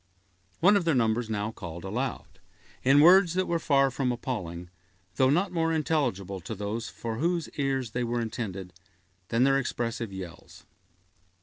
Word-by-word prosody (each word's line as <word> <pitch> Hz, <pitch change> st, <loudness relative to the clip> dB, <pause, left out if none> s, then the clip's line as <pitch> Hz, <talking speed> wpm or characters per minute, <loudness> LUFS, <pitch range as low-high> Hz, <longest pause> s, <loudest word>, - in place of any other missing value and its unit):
One 195 Hz, +5 st, +6 dB
of 200 Hz, -, +2 dB
their 165 Hz, -3 st, +2 dB
number 115 Hz, -1 st, +2 dB
now 105 Hz, 0 st, -2 dB
called 85 Hz, -6 st, -8 dB
aloud, 120 Hz, +7 st, -4 dB, 0.4 s
in 135 Hz, +3 st, +6 dB
words 180 Hz, +1 st, +6 dB
that 185 Hz, 0 st, +1 dB
were 170 Hz, -1 st, 0 dB
far 140 Hz, -3 st, +3 dB
from 125 Hz, 0 st, 0 dB
appalling, 90 Hz, -9 st, -5 dB, 0.5 s
though 130 Hz, -, +4 dB
not 175 Hz, +8 st, +2 dB
more 165 Hz, -1 st, 0 dB
intelligible 125 Hz, -, -1 dB
to 110 Hz, +6 st, -6 dB
those 105 Hz, +3 st, -4 dB
for 115 Hz, -1 st, -5 dB
whose 170 Hz, +3 st, 0 dB
ears 135 Hz, -4 st, -2 dB
they 125 Hz, +2 st, -1 dB
were 120 Hz, 0 st, -1 dB
intended, 100 Hz, -6 st, -5 dB, 0.5 s
than 115 Hz, +4 st, +2 dB
their 135 Hz, 0 st, +4 dB
expressive 115 Hz, -4 st, -3 dB
yells. 95 Hz, -3 st, -10 dB
125 Hz, 160 wpm, -28 LUFS, 105-145 Hz, 0.5 s, One